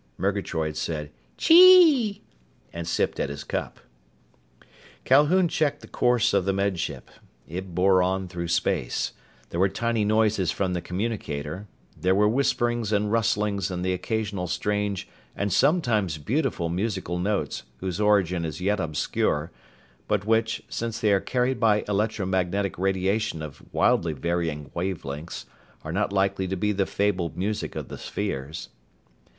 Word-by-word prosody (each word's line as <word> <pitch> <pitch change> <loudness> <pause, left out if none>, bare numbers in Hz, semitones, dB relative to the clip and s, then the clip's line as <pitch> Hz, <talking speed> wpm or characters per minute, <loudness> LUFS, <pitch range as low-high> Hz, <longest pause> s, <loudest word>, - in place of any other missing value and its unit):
Murgatroyd 90 -6 -1
said 75 -1 -3 0.3
"Chee!" 330 - +7 0.5
and 85 -1 -5
sipped - - 0
at - - -1
his 70 0 -6
cup. - - -4 1.3
Calhoun 150 +7 +5
checked 155 -4 0
the - - -12
course 120 -2 +2
of 100 -2 +3
the 95 - +1
Med 100 -2 0
Ship. 85 - -4 0.4
It 90 +1 -6
bore 95 +1 +4
on 95 +1 0
through 85 -1 -5
space. 85 -5 0 0.4
There 85 - -3
were 95 +1 +4
tiny 115 +1 0
noises 105 -3 +2
from 95 -2 -1
the 90 - -2
communicator. 90 -3 -4 0.3
There 95 +1 +1
were 105 +1 +4
whisperings 120 -2 +1
and 105 0 +1
rustlings 105 -3 +1
and 90 -1 -3
the 95 - +1
occasional 100 -1 -2
strange 105 +2 -1 0.3
and 100 0 -1
sometimes 110 - +2
beautiful 90 - -1
musical 90 0 -2
notes 100 +3 -1 0.2
whose 95 +3 -3
origin 95 -5 +2
is 80 -1 -4
yet 100 +3 0
obscure, 80 0 -1 0.6
but 105 -2 0
which, 115 +1 +1
since 115 -1 -4
they 105 -2 +3
are 100 - +4
carried 125 +4 0
by 105 -3 +3
electromagnetic 100 -3 -1
radiation 95 -2 0
of 75 -2 -9
wildly 80 -2 +2
varying 80 -1 -2
wave 90 0 -3
lengths, 75 +5 -6 0.4
are 80 - -5
not 100 +1 0
likely 95 -1 +1
to 95 - -2
be 105 +3 0
the 100 -1 0
fabled 95 -5 -1
music 105 +3 -2
of - - -5
the - - -8
spheres. 70 +5 -4
95 Hz, 145 wpm, -25 LUFS, 85-110 Hz, 1.3 s, Chee